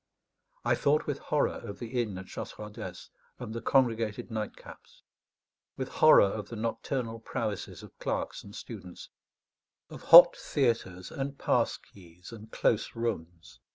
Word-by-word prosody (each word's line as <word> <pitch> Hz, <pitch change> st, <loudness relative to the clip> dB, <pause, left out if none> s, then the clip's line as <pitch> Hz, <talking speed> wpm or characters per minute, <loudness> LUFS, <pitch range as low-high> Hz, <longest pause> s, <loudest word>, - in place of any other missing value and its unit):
I -, -, +3 dB
thought 150 Hz, +2 st, +2 dB
with -, -, -3 dB
horror -, -, 0 dB
of 100 Hz, -1 st, -7 dB
the 120 Hz, +3 st, -2 dB
inn 105 Hz, -5 st, -4 dB
at 95 Hz, -, -8 dB
Chasseradès 105 Hz, -2 st, -8 dB, 0.3 s
and 110 Hz, -, -7 dB
the 115 Hz, -, -5 dB
congregated 115 Hz, -4 st, +1 dB
nightcaps; 110 Hz, -1 st, -8 dB, 0.7 s
with 130 Hz, 0 st, -4 dB
horror 155 Hz, -, +6 dB
of 100 Hz, +1 st, -4 dB
the 115 Hz, -, -7 dB
nocturnal 115 Hz, +1 st, -3 dB
prowesses 110 Hz, -4 st, -4 dB
of -, -, -14 dB
clerks -, -, -3 dB
and 100 Hz, +1 st, -12 dB
students, 95 Hz, -8 st, -9 dB, 0.8 s
of -, -, -9 dB
hot 175 Hz, +1 st, +10 dB
theatres 110 Hz, -, -1 dB
and 140 Hz, 0 st, -4 dB
pass -, -, +1 dB
keys 90 Hz, 0 st, -16 dB
and 110 Hz, -1 st, -11 dB
close 110 Hz, -, 0 dB
rooms. 90 Hz, -8 st, -5 dB
110 Hz, 140 wpm, -29 LUFS, 100-120 Hz, 0.8 s, hot